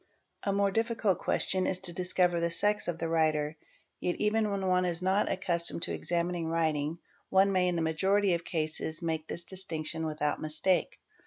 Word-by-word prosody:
z - - -1
A - - +2
more 200 0 +2
difficult 225 -2 0
question 185 -1 0
is 185 - +1
to 185 -2 0
discover 180 -1 +1
the 170 0 0
sex 205 +5 +2
of 175 -2 -2
the 165 - -2
writer; 155 -2 +1 0.4
yet. 175 - -1
even 210 0 +1
when 200 -1 -2
one 185 0 +2
is 175 0 -1
not 190 +3 +2
accustomed 170 -3 0
to - - -2
examining 170 -1 -1
writing 160 -1 0 0.3
one 195 +1 +4
may 185 -1 +2
in 180 - 0
the 165 - 0
majority 190 +4 +2
of 170 0 -1
cases 160 0 -2
make 160 -1 -2
this 170 - -3
distinction 160 -3 -3
without 150 -1 -2
mistake. 155 +4 +1
175 Hz, 185 wpm, -30 LUFS, 160-190 Hz, 0.4 s, one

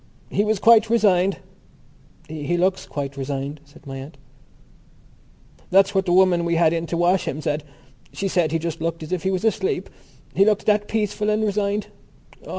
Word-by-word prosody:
"He 205 - +1
was 215 0 +1
quite 225 +2 +5
resigned." 195 -5 +3 0.9
"He 160 +2 -3
looks 185 +2 0
quite 140 -1 -5
resigned," 140 +2 -4
said 150 +2 -19
my 135 -1 -7
aunt. 140 +2 -10 1.5
"That's 195 +1 +4
what 190 -1 0
the - - +1
woman 180 -1 +4
we 170 0 0
had 165 -1 +3
in 165 0 -2
to 170 - -2
wash 175 +2 +2
him 145 - -3
said. 150 0 -2 0.5
She 200 - -3
said 175 -4 +1
he 165 - +1
just 165 -1 -5
looked 165 0 -3
as 155 - -9
if 185 -2 -1
he 190 - -1
was 190 +2 -1
asleep, 385 - -1 0.4
he 195 - +4
looked 210 0 +1
that 210 -1 +2
peaceful 210 -1 -1
and 215 +1 +1
resigned. 205 0 -1
180 Hz, 180 wpm, -22 LUFS, 160-205 Hz, 1.5 s, quite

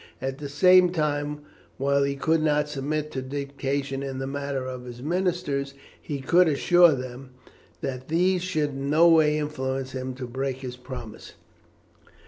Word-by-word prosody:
At 135 +1 -4
the 145 -1 -6
same 180 +5 +6
time, 150 -3 -1 0.4
while 140 +1 +2
he 140 0 0
could 160 +3 +1
not 150 -1 +2
submit 150 +1 -3
to 130 - -3
dictation 140 0 -3
in 135 -1 -4
the 135 - -3
matter 140 -1 -3
of 125 -1 -6
his 120 -1 -9
ministers, 165 -5 -1 0.3
he 140 -2 -5
could 175 +7 +4
assure 175 +3 +5
them 130 0 -7 0.5
that 130 -1 -4
these 180 +3 +2
should 155 -5 -1
in 135 +1 -4
no 160 +3 +6
way 155 -2 +5
influence 135 -3 -3
him 130 -1 -5
to 130 0 -6
break 130 +1 -3
this 125 -2 -6
promise. 125 -3 -9
140 Hz, 160 wpm, -25 LUFS, 130-155 Hz, 0.5 s, same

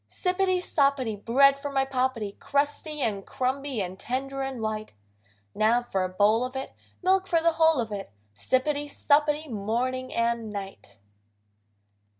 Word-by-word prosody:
Sippity, 370 0 +1
soppity, 275 -9 +1
Bread 275 +6 +4
for 285 - -4
my 270 -1 +2
Poppety, 255 -5 -1
Crusty 290 +1 -1
and 210 -5 -1
crumby 260 -2 -2
and 185 +1 -9
tender 270 +2 -3
and 270 -2 -4
white: 215 -1 -3 0.6
Now 230 +3 +3
for 195 -5 -2
a 185 - -2
bowl 210 +5 +3
of 255 +1 -5
it! 265 - -5 0.3
Milk 375 +1 +3
for 335 -3 +3
the 335 +1 +3
whole 320 -2 +3
of 225 -2 -2
it! 200 - -5 0.2
Sippity, 285 - 0
suppity, 295 +1 +2
morning 250 +3 -2
and 230 -1 0
night. 195 - -8
260 Hz, 150 wpm, -27 LUFS, 220-285 Hz, 0.6 s, Bread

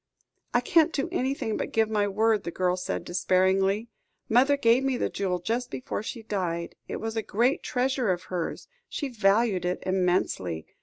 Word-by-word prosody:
"I 245 - +3
can't 320 +5 +4
do 275 +1 -2
anything 265 -8 -1
but - - -3
give 225 -1 +2
my 210 -2 +1
word," 215 +1 +2
the - - -4
girl 180 +1 0
said 180 -1 -4
despairingly. 190 +4 +2 0.4
"Mother 265 +5 +4
gave 240 0 +4
me 270 -2 +1
the - - -1
jewel 185 -2 -1
just 235 +7 -2
before 255 - -4
she 225 +1 -6
died. 175 -5 -3
It - - -4
was 225 0 -4
a 225 - 0
great 240 +6 +1
treasure 255 -2 0
of 180 0 -2
hers; 180 -3 -4 0.2
she 285 - -3
valued 210 -3 +2
it 180 0 -2
immensely. 180 - 0
215 Hz, 175 wpm, -27 LUFS, 185-245 Hz, 0.4 s, can't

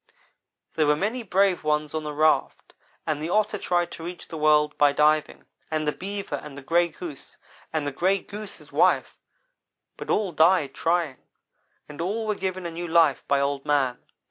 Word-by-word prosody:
"There 155 -2 +2
were 150 - +4
many 215 +10 -2
brave 195 -4 +2
ones 150 0 0
on 155 - -1
the 150 - -4
raft, 155 +1 +1 0.3
and 155 -2 -2
the 160 - -3
Otter 210 +1 +1
tried 175 -2 0
to 165 - -8
reach 175 +1 -8
the - - -7
world 150 -1 +3
by 145 -1 +5
diving; 150 +1 +2 0.2
and 155 -1 -1
the - - +3
Beaver, 200 +4 -5
and 140 -2 -10
the 140 - -9
Gray 170 +4 +3
Goose, 160 -3 -9 0.3
and 155 -2 -1
the 145 - -1
Gray 185 +8 +2
Goose's 210 +1 -9
wife; - - +2 0.8
but - - -8
all 205 -3 +1
died 160 -1 +4
in - - -29
trying, 165 -5 0 0.7
and 150 +2 -8
all 210 +6 -2
were 215 - 0
given 185 -2 -4
a 170 - -3
new 175 +1 -5
life 165 -4 +3
by 140 - +3
Old 140 0 -1
man. 140 -4 +1
160 Hz, 190 wpm, -25 LUFS, 150-185 Hz, 0.8 s, by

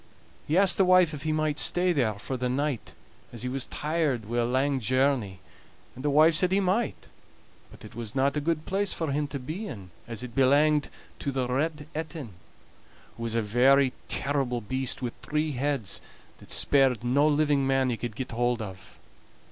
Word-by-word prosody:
He 155 - +1
asked 195 -1 +5
the 195 - +5
wife 185 -3 +5
if 145 - -6
he 155 +1 -1
might 155 -1 0
stay 180 0 +2
there 120 -8 +1
for 100 +6 -5
the 125 0 -2
night, 135 -2 -2 0.4
as 120 0 -6
he 125 - -2
was 135 0 -2
tired 150 -7 -1
wi' 120 +3 -2
a 120 - +2
lang 135 +3 +1
journey; 125 -5 0 0.5
and 130 - -10
the 145 - +1
wife 155 +3 +5
said 180 +3 +3
he 195 - +3
might, 200 +4 -1 0.6
but - - -14
it 105 - -12
was 115 -1 -7
not 140 +2 +2
a 150 - 0
good 160 0 -1
place 195 +1 -1
for 160 -4 -3
him 145 +1 -1
to 140 - -5
be 155 +11 -6
in, 95 - -9 0.2
as 115 0 -4
it 125 -2 -7
belanged 145 +3 +3 0.3
to 140 - -2
the 130 -2 -1
Red 150 +4 -1
Etin, 155 -4 -5 0.9
who - - -11
was 115 -1 -3
a 115 - +1
very 130 +5 +4
terrible 135 -3 -1
beast, 130 +4 -2
wi' 120 - -2
three 150 +1 -1
heads, 135 -5 -2 0.4
that - - -16
spared 135 -4 +4
no 140 +5 +3
living 145 -2 +2
man 135 -1 +2
he - - -1
could 120 -2 -5
get 130 - -5
hold 120 +1 0
of. 95 -4 -9
135 Hz, 195 wpm, -27 LUFS, 120-155 Hz, 0.9 s, asked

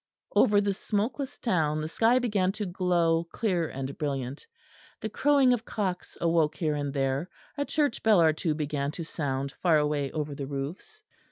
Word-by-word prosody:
Over 205 -4 +5
the 200 -1 0
smokeless 225 +8 -2
town 155 -9 +1
the 155 - -3
sky 225 +9 +3
began 205 -7 +1
to 215 0 -4
glow 175 -2 +1
clear 180 -7 0
and 135 +1 -5
brilliant. 135 -2 -3 0.5
The 220 - -4
crowing 275 +2 +4
of 235 -3 -1
cocks 190 -5 -3
awoke 165 -3 +2
here 155 -1 0
and 145 -1 -2
there; 135 +4 -1 0.3
a 285 -1 -1
church 290 -5 0
bell 215 -4 +5
or 160 -2 +5
two 155 0 -1
began 145 -2 -2
to 170 - -5
sound 140 -4 -3
far 165 0 +2
away 150 -2 0
over 150 -2 -3
the 140 -1 -5
roofs. 155 - -6
165 Hz, 175 wpm, -28 LUFS, 145-210 Hz, 0.5 s, Over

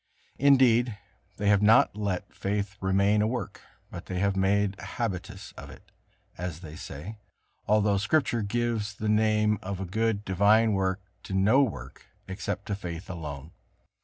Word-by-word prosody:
Indeed, 125 -5 +4 0.4
they 105 - -1
have 100 -1 +4
not 110 0 +5
let 100 -4 -3
faith 100 0 -3
remain 100 +2 +2
a 105 - +2
work, 120 -5 -4 0.3
but - - -8
have 95 +1 0
made 100 +1 +1
a - - -9
habitus 100 -1 -5
of - - -11
it, - - -15 0.5
as 90 -2 -5
they 80 -3 -9
say, 90 +10 -8 0.5
although 105 -1 +3
Scripture 115 +3 +1
gives 115 0 -2
the 110 - -4
name 105 -1 +2
of 95 0 -5
a 95 - -3
good, 105 +2 -1
divine 105 +4 +4
work 95 0 0 0.2
to 95 - -6
no 105 +8 +4
work 75 - -4 0.2
except 95 +1 -4
to 100 - -2
faith 90 -1 -7
alone. 75 -3 -7
100 Hz, 155 wpm, -27 LUFS, 95-110 Hz, 0.5 s, not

